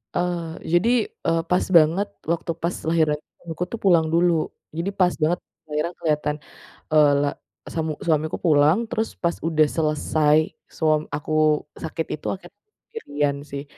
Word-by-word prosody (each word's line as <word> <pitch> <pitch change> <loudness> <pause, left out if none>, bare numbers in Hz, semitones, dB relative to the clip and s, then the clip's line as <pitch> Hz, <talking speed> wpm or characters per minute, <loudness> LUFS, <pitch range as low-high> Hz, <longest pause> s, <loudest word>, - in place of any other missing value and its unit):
Eee, 175 -2 -2 0.2
jadi, 200 +7 +4 0.4
eee, 165 0 +2
pas 180 - +2
banget 165 +6 +3 0.2
waktu 170 0 -1
pas 170 +2 -2 0.2
lahiran 155 -2 +2 0.2
suamiku 170 0 -5
tuh 230 - -3
pulang 170 -4 +5
dulu. 170 -2 +2 0.3
Jadi 175 +4 -1
pas 180 -1 +4
banget 165 +3 +2 0.3
lahiran 155 +4 -1
keliatan, 150 -2 0 0.6
eee, 150 -2 +6
le 145 - +1 0.5
samu 160 -2 -1
suamiku 155 -1 +1
pulang 150 +3 +5
terus 225 -2 -2
pas 170 - +1
udah 155 -2 +3
selesai, 155 -1 +2 0.4
suam 155 -1 +3
aku 150 +1 -4 0.5
sakit 160 0 -3
itu, - - -23
akhirnya 190 - -12 0.2
sendirian 145 - -2
sih 140 0 -4
160 Hz, 145 wpm, -23 LUFS, 150-175 Hz, 0.6 s, eee